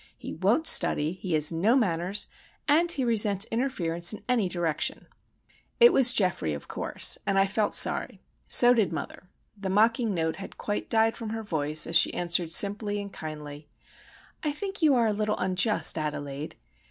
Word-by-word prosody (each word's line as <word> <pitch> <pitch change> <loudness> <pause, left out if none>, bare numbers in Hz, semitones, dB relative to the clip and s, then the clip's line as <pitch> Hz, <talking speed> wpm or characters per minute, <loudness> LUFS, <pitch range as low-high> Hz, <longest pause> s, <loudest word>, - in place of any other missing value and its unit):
He - - -9
won't 205 - 0
study, 155 - +3
he 180 -1 -6
has 155 0 +3
no 190 +9 +1
manners, 190 -4 -1 0.4
and 330 +4 +2
he 270 -6 -1
resents 210 -3 +1
interference 175 -8 0
in 215 - -10
any 235 -7 0
direction." 170 -3 -3 0.7
It 475 0 +6
was 250 -2 +5
Geoffrey, 175 - -1
of 70 - -11
course—and 195 - +1
I 195 - +3
felt 205 +1 -2
sorry. - - +1 0.3
So 245 0 +6
did 220 -7 0
mother. 180 - -8 0.3
The 195 -2 -6
mocking 220 +2 +1
note 160 -1 -3
had 195 - -11
quite 205 - -5
died 225 0 +2
from 225 - -7
her 225 0 -6
voice, 155 -5 0
as 165 - 0
she - - +6
answered 170 -1 0
simply 205 +3 +1
and 200 -1 -8
kindly,— 150 -1 -9 0.7
"I 300 - -2
think 390 +5 -6
you 300 -4 +3
are 235 -2 +1
a 215 - 0
little 210 0 -2
unjust, 185 -1 +1
Adelaide. 150 -1 -6
200 Hz, 170 wpm, -26 LUFS, 165-225 Hz, 0.7 s, It